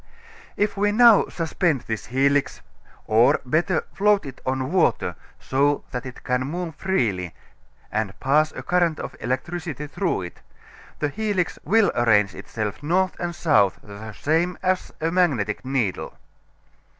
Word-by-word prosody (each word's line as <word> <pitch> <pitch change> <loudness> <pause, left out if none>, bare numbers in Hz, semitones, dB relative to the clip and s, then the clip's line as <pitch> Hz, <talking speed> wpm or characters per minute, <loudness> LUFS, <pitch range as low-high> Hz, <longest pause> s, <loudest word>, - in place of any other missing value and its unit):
If 210 0 0
now 210 +2 +6
we - - -15
suspend 165 -4 0
this 110 -1 -5
helix, 135 +3 +1 0.4
or, 110 +2 +4
better, 160 +6 +1
float 205 -1 +3
it 135 -2 -9
on 130 +2 -1
water 185 -2 +1 0.2
so 140 +2 +1
that 125 0 -4
it 125 - -10
can 125 0 0
move 170 +2 -4
freely, 110 - -1 0.6
and 105 -2 -2
pass 150 +3 +2
a - - -8
current 175 -3 +1
of - - -6
electricity 150 +3 -3
through 155 - -2
it, 85 - -10 0.6
the 150 - -1
helix 205 0 -1
will 220 +5 +3
arrange 105 -4 +3
itself 105 -1 -5
north 185 +5 +1
and 175 -1 -3
south 125 - +3
the 105 +1 -9
same 165 - 0
as 185 0 0
a 165 +1 0
magnetic 140 - +1
needle. 130 -7 -2
145 Hz, 140 wpm, -23 LUFS, 120-180 Hz, 0.6 s, now